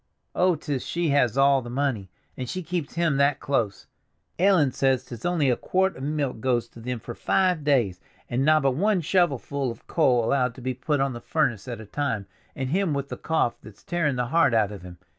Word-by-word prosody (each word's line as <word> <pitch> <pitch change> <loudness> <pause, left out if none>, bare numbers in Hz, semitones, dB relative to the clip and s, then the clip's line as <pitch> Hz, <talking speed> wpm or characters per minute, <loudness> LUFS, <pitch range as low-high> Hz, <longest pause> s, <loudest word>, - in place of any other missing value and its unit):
Oh, 180 -1 +3
'tis 145 -3 -3
she 170 -1 -1
has 135 -4 +2
all 135 0 +5
the 120 - -8
money, 125 -7 -1 0.3
and 125 -2 -5
she 185 - -4
keeps 165 -2 -4
him 170 -4 +1
that 140 -1 +3
close! 115 -8 -1 0.5
Ellen 180 -7 +4
says 130 0 +1
'tis 120 -2 -9
only 170 -5 +1
a - - +2
quart 190 +7 0
of - - -10
milk 145 -3 -2
goes 120 -1 0
to - - -14
them 125 +1 -4
for 120 - -7
five 180 +3 +1
days, 120 -11 +2 0.3
and 125 +3 0
nobbut 150 -3 +4
one 195 +6 +1
shovelful 140 -5 0
of 115 - -9
coal 125 -8 +2
allowed 125 -1 +1
to 130 - -11
be 130 +1 -2
put 140 +3 -1
on 135 -1 0
the 120 - -8
furnace 125 -10 -1
at 120 -3 -5
a 110 - -9
time, 115 -3 -2 0.3
and 130 -1 -3
him 185 -3 +1
with 140 0 -3
the - - -4
cough 160 -7 -1
that's 105 -2 -14
tearing 165 -6 0
the 125 -1 -2
heart 145 -8 +4
out 105 -2 +2
of 100 -3 -8
him! 90 -1 -11
135 Hz, 215 wpm, -25 LUFS, 120-155 Hz, 0.5 s, all